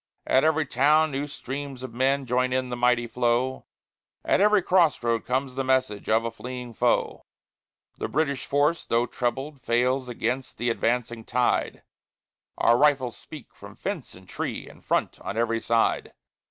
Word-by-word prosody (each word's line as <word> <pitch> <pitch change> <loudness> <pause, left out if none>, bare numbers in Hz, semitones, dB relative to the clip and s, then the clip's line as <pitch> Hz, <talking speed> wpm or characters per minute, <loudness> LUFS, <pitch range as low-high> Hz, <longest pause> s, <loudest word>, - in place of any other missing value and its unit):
At 130 - +3
every 160 0 +2
town 150 +4 +3
new 140 +2 -2
streams 140 -1 -6
of 130 -3 -7
men 135 +3 +1
join 125 +1 +1
in 130 -1 -1
the 120 - -3
mighty 120 0 +2
flow; 125 +2 0 0.6
At - - +3
every 210 -2 +4
crossroad 145 -12 +2
comes 130 +1 -1
the 135 +1 -2
message 130 -5 0
of 110 +1 +3
a 115 - -2
fleeing 125 0 -7
foe: 120 +2 0 0.8
The - - -2
British 140 -3 -1
force, 145 +4 +2
though 115 +1 +1
trebled, 135 +4 -3
fails 125 +2 +1
against 125 +2 -3
the 120 0 0
advancing 115 0 -1
tide. 125 +2 0 0.7
Our 120 +1 +4
rifles 140 -5 +3
speak - - -12
from - - -13
fence - - -5
and - - -16
tree - - -4
in - - -15
front, - - -1
on 105 - -5
every 115 0 0
side. 115 -1 +1
125 Hz, 160 wpm, -26 LUFS, 120-140 Hz, 0.8 s, every